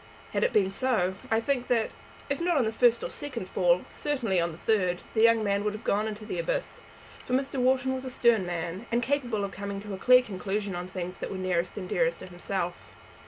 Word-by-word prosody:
Had -, -, +1 dB
it 480 Hz, -, +2 dB
been 190 Hz, -2 st, +3 dB
so, 210 Hz, -6 st, +1 dB, 0.2 s
I 225 Hz, -, +3 dB
think 250 Hz, +1 st, -1 dB
that, 230 Hz, -3 st, +1 dB, 0.4 s
if 280 Hz, +3 st, -2 dB
not 345 Hz, -2 st, +2 dB
on 265 Hz, -, +4 dB
the 220 Hz, -, 0 dB
first 235 Hz, 0 st, +3 dB
or -, -, -3 dB
second 255 Hz, -10 st, -4 dB
fall, 180 Hz, -1 st, +2 dB
certainly 235 Hz, -, 0 dB
on 170 Hz, 0 st, 0 dB
the 160 Hz, -, -10 dB
third, 185 Hz, -4 st, +1 dB
the 220 Hz, -, +2 dB
young 230 Hz, -1 st, +5 dB
man 200 Hz, -1 st, +1 dB
would 210 Hz, 0 st, 0 dB
have 215 Hz, -, -8 dB
gone 210 Hz, +2 st, +1 dB
into 215 Hz, 0 st, -6 dB
the -, -, -4 dB
abyss; -, -, -2 dB, 0.4 s
for 250 Hz, -, -1 dB
Mr. 270 Hz, 0 st, -1 dB
Wharton 260 Hz, +1 st, +2 dB
was 260 Hz, 0 st, -4 dB
a 260 Hz, -, -4 dB
stern 235 Hz, -4 st, +3 dB
man, 175 Hz, +4 st, -4 dB
and 240 Hz, +1 st, +2 dB
capable 245 Hz, -6 st, 0 dB
of 195 Hz, -, -6 dB
coming 200 Hz, 0 st, -5 dB
to 205 Hz, -1 st, -7 dB
a 190 Hz, -, -5 dB
clear 250 Hz, +3 st, +6 dB
conclusion 200 Hz, -1 st, -3 dB
on 175 Hz, +1 st, -4 dB
things 180 Hz, -1 st, -5 dB
that -, -, -4 dB
were 190 Hz, -, -4 dB
nearest 180 Hz, -1 st, -1 dB
and 195 Hz, -, -4 dB
even -, -, -3 dB
dearest -, -, +2 dB
to -, -, -9 dB
himself. -, -, -4 dB
220 Hz, 240 wpm, -28 LUFS, 190-255 Hz, 0.4 s, clear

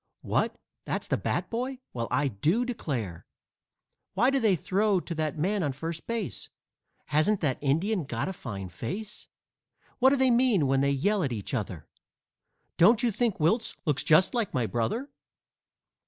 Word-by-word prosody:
What -, -, 0 dB, 0.3 s
that's -, -, -3 dB
the -, -, 0 dB
bat -, -, -2 dB
boy? 255 Hz, +3 st, -2 dB, 0.2 s
Well, 115 Hz, -2 st, -2 dB
I 145 Hz, -, +1 dB
do 155 Hz, -, +1 dB
declare!" 125 Hz, -, -4 dB, 0.9 s
"Why 245 Hz, +7 st, +4 dB
do 275 Hz, -, +2 dB
they 215 Hz, -6 st, +3 dB
throw 195 Hz, +4 st, +1 dB
to 175 Hz, -, -6 dB
that 155 Hz, 0 st, -2 dB
man 195 Hz, +6 st, 0 dB
on 145 Hz, -5 st, 0 dB
first 165 Hz, +4 st, -5 dB
base?" 230 Hz, -5 st, -2 dB, 0.6 s
"Hasn't 155 Hz, +7 st, +2 dB
that 140 Hz, -6 st, 0 dB
Indian 165 Hz, +6 st, +1 dB
got 120 Hz, +1 st, -3 dB
a 190 Hz, -, -3 dB
fine 100 Hz, -, -6 dB
face?" 190 Hz, -, -6 dB, 0.7 s
"What 260 Hz, +1 st, +6 dB
do 275 Hz, -, +3 dB
they 265 Hz, -2 st, +3 dB
mean 235 Hz, -, +4 dB
when 135 Hz, 0 st, +2 dB
they 140 Hz, -, +3 dB
yell 195 Hz, +10 st, +1 dB
at 140 Hz, -6 st, -1 dB
each 105 Hz, 0 st, -4 dB
other?" 95 Hz, -, -3 dB, 0.9 s
"Don't 220 Hz, +7 st, +5 dB
you 240 Hz, -, +3 dB
think 220 Hz, 0 st, 0 dB
Wiltse 210 Hz, +10 st, +1 dB
looks 150 Hz, -4 st, +1 dB
just 170 Hz, +7 st, +5 dB
like 235 Hz, -5 st, -1 dB
my 125 Hz, -2 st, +1 dB
brother?" 120 Hz, -, -2 dB
170 Hz, 170 wpm, -28 LUFS, 135-220 Hz, 0.9 s, What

